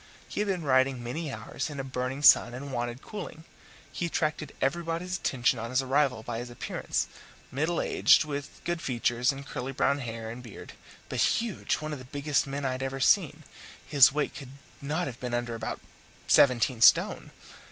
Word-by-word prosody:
He - - -5
had 210 - 0
been 185 -4 -1
riding 130 -2 +2
many 145 +5 -4
hours - - -5
in 145 -2 -7
a - - -2
burning 130 +1 -4
sun, 120 -4 +7
and 140 +1 -7
wanted 120 +1 -3
cooling. 200 -6 -8 0.5
He 175 - -2
attracted 155 -1 -2
everybody's 170 +5 -1
attention 120 -1 +1
on 115 +1 -5
his 130 +1 +1
arrival 130 -3 +1
by 115 -1 -4
his 120 0 -6
appearance: 120 - -3 0.5
middle 160 +6 0
aged, - - +4
with 145 -1 -6
good 175 -1 -2
features 120 0 +1
and 140 0 -8
curly 135 -1 -5
brown 140 +1 +1
hair 115 -3 -5
and 120 +2 -8
beard, 115 -5 -11 0.3
but - - -4
huge 230 -4 +1
one 155 0 -5
of 145 - -6
the 130 - -11
biggest 145 +2 -1
men 140 +1 -4
I 130 - +1
had 130 +1 -4
ever 135 0 -3
seen; 155 0 +3 0.4
his 140 -4 +6
weight 150 +1 -1
could 135 -3 -10 0.3
not 155 +5 -1
have 125 -3 -7
been 125 -1 -3
under 120 -1 -2
about 115 -1 -4 0.5
seventeen 125 -2 +4
stone. - - +5
135 Hz, 185 wpm, -28 LUFS, 125-150 Hz, 0.5 s, sun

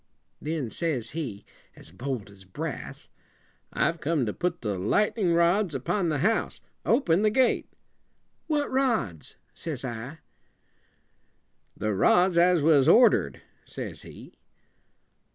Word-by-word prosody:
Then 150 -7 -3
says 140 -9 -2
he, 125 -11 -5 0.3
as - - -14
bold 115 +1 -5
as 100 -1 -15
brass, 95 0 -7 0.6
"I've 170 0 0
come 150 -4 0
to 105 - -3
put 175 -1 -2
the 100 -4 -2
light 160 - +1
en 210 -5 0
ing 170 - +3
rods 170 0 +2
upon 170 +7 -1
the 150 - 0
house. 225 +1 0 0.2
Open 200 - +2
the 215 - +3
gate." 255 +3 +1 0.8
"What 300 -2 0
rods?" 230 - -1 0.2
says 145 -6 -5
I. 125 +5 -6 1.6
"The 110 0 -1
rods 180 - +3
as 175 -3 +4
was 145 -4 +4
order 240 0 +6
ed," - - -14 0.2
says - - -7
he. - - -13
160 Hz, 135 wpm, -26 LUFS, 120-185 Hz, 1.6 s, order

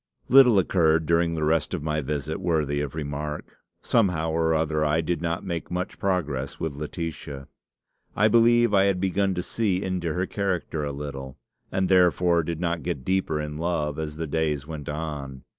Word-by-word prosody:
"Little 125 -4 +7
occurred 80 -4 +3
during 85 +1 +2
the 80 - -2
rest 80 0 +1
of - - -5
my 75 0 -1
visit 75 +3 -3
worthy 75 -5 0
of 75 0 -4
remark. 75 0 -5 0.2
Somehow 90 -8 +2
or 80 0 +1
other 80 -1 0
I 75 +1 +2
did 85 0 -1
not 85 +2 -2
make 85 -3 -4
much 90 +1 -4
progress 75 -8 -1
with 80 -3 -2
Laetitia. 75 -2 -6 0.7
I 105 - +4
believe 120 0 +4
I 95 -1 +5
had 100 -2 +1
begun 95 +1 +1
to 90 - -2
see 100 -4 -1
into 90 -4 -2
her 90 +1 0
character 90 -6 -2
a 70 - -2
little, 70 -2 -7 0.3
and 95 0 +1
therefore 90 -2 +4
did 85 0 -4
not 85 -1 -1
get 65 - -4
deeper 95 -5 0
in 75 0 -5
love 80 -3 -1
as 75 -1 -4
the 80 - -2
days 75 -2 -1
went 75 -2 -7
on. 75 -3 -5
80 Hz, 180 wpm, -25 LUFS, 75-90 Hz, 0.7 s, Little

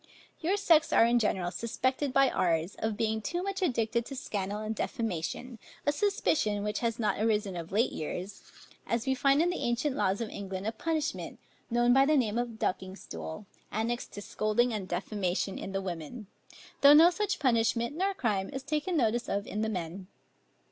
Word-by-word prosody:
Your 360 +5 +1
sex 330 -6 +4
are - - +6
in 240 +1 +3
general 185 -5 0
suspected 260 +5 -1
by 275 0 +4
ours, 170 +1 +1
of 220 -1 -1
being 220 -1 0
too 350 +10 -2
much 395 0 -3
addicted 235 -7 +1
to 275 - -6
scandal 205 -5 -3
and 215 +1 -3
defamation; 225 - -3 0.3
a 290 - +4
suspicion, 290 - +1
which 210 0 -1
has 230 -1 -1
not 210 -5 0
arisen 210 -3 +1
of 170 -1 -6
late 220 +6 +2
years, 180 +5 -5 0.5
as 230 -1 -1
we 265 - +2
find 275 +3 +3
in 350 - +1
the 360 - -4
ancient 240 +4 0
laws 195 -8 +1
of 230 -2 -3
England 195 -1 -5
a 220 - 0
punishment, 315 +5 -2 0.3
known 240 +1 +4
by 270 +1 +5
the 305 0 +4
name 230 -3 +1
of 240 -2 -3
ducking 190 -2 -2
stool, 195 0 -7 0.3
annexed 230 +3 -2
to 205 - -7
scolding 215 +4 +1
and 200 -4 -3
defamation 190 +1 -2
in 195 - -6
the 195 0 -1
women, 180 +5 -6 0.6
though 285 +1 +9
no 330 +4 +8
such 410 +3 -1
punishment 235 0 +1
nor 385 +3 0
crime 205 - 0
is 270 0 -5
taken 305 +5 -1
notice 240 -2 +1
of 200 +1 -1
in 210 - -3
the 220 - 0
men. 185 -1 -5
230 Hz, 190 wpm, -30 LUFS, 200-275 Hz, 0.6 s, though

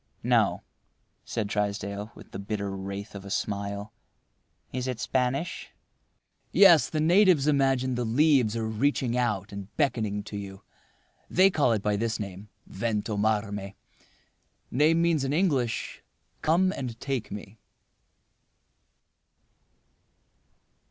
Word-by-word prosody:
"No," - - +2 0.6
said 110 -3 -3
Trysdale, 100 +1 -3
with - - -14
the - - -6
bitter 100 0 -3
wraith 100 +2 -6
of 100 -1 -8
a 100 - -9
smile—"Is 100 +5 -6
it 125 -3 -3
Spanish?" 130 +7 -1 0.8
"Yes. 175 -6 +7
The 155 - -2
natives 175 -2 +5
imagine 135 -3 +2
the 120 0 -1
leaves 125 -2 +3
are 115 - -1
reaching 120 +2 0
out 105 -5 -1
and 100 -1 -7
beckoning 110 -8 0
to 105 0 -7
you. 95 -1 -8 0.7
They 190 +2 +5
call 145 -8 +2
it 105 -3 -2
by 105 -1 +1
this 115 +1 -1
name—Ventomarme. 105 0 -3 1.0
Name 155 +6 +3
means 165 -4 +2
in 135 +1 -1
English, 145 -9 0 0.4
'Come 185 +4 +3
and 120 -4 -5
take 135 -5 -3
me. 105 +1 -8
115 Hz, 110 wpm, -27 LUFS, 100-140 Hz, 1.0 s, Yes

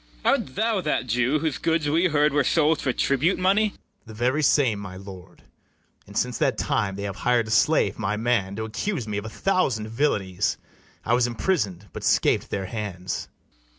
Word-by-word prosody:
CALYMATH. - - +3
Art 130 - -16
thou 220 -2 +1
that 150 -5 -1
Jew 125 +4 +1
whose 155 -2 -2
goods 160 -2 0
we 165 +5 +3
heard 150 -2 +2
were 145 -1 +3
sold 155 +3 +2
For 135 - +1
tribute 140 +8 +1
money? 195 +4 +3
BARABAS. 165 - -27
The 110 - -9
very 125 +6 +1
same, 130 -7 +3
my 95 -2 -8
lord: 95 -2 -12 0.6
And - - -7
since - - -1
that - - +1
time 100 -2 0
they 100 - -5
have 100 0 -4
hir'd 120 -2 +1
a - - -4
slave, 155 +5 +3
my 105 0 -1
man, 110 -4 0
To 110 - -3
accuse 120 - -3
me 105 -1 -2
of 105 - -9
a - - -5
thousand 125 - 0
villanies: 105 -7 0 0.5
I 115 - +1
was 120 0 +3
imprisoned, 110 - -1
but - - -6
scap - - +3
[']d - - -16
their 95 - -3
hands. 95 -3 -5
120 Hz, 200 wpm, -24 LUFS, 105-150 Hz, 0.6 s, CALYMATH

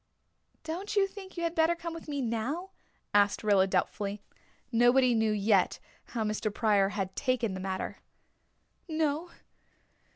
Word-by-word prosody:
"Don't 350 +7 -4
you 400 -1 +5
think 385 -1 -10
you 340 - -2
had 335 -1 0
better 325 0 +3
come 335 0 -6
with 330 - -9
me 285 -2 -2
now?" 255 +11 -2 0.4
asked 205 +1 +3
Rilla 200 -3 +4
doubtfully. 200 +2 -1 0.5
Nobody 245 +2 +5
knew 220 -1 +2
yet 205 -2 +2 0.3
how 230 -2 -3
Mr. 215 0 -1
Pryor 205 -3 +3
had 190 -1 -3
taken 250 -6 0
the 185 - -5
matter. 190 0 -4 0.9
"No. 315 +1 -1
235 Hz, 140 wpm, -30 LUFS, 205-325 Hz, 0.9 s, you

